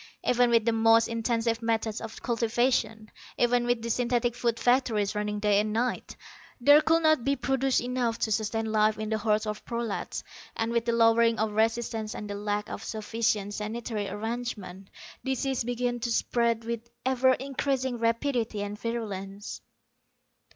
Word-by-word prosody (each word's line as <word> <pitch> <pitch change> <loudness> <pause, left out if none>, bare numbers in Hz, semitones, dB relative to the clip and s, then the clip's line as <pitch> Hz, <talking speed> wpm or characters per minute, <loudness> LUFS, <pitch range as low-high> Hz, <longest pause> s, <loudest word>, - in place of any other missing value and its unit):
Even 245 0 +3
with 230 -2 +3
the 230 - +3
most 225 0 +4
intensive 230 0 -1
methods 225 -1 -1
of 225 -1 -8
cultivation, 230 -2 0 0.3
even 240 0 +2
with 240 -2 0
the 235 - -3
synthetic 240 0 +1
food 235 -1 -1
factories 235 -5 +2
running 210 0 -2
day 205 -1 +3
and 215 +1 0
night, 240 +3 -2 0.4
there 290 +5 +7
could 325 +1 +2
not 310 -5 +4
be 275 +2 +1
produced 265 +1 +1
enough 245 -2 -1
to 220 - -1
sustain 220 +1 0
life 215 0 +3
in 215 0 -4
the 220 0 0
hordes 215 0 +1
of 210 -1 -4
prolats. 235 -3 -4 0.3
And 225 0 -1
with 235 0 0
the 235 - +1
lowering 230 0 +4
of 220 0 0
resistance 220 0 -1
and 210 - -6
the 205 - -4
lack 205 0 -2
of - - -6
sufficient 215 -2 -1
sanitary 215 -1 -4
arrangements, 205 -3 -5 0.3
disease 265 -1 -1
began 245 0 -2
to 235 0 -2
spread 230 0 +1
with 235 0 -4 0.2
ever 260 0 +4
increasing 265 -2 -2
rapidity 230 -2 0
and 205 +1 -6
virulence. 205 -3 -5
230 Hz, 160 wpm, -28 LUFS, 215-245 Hz, 0.4 s, there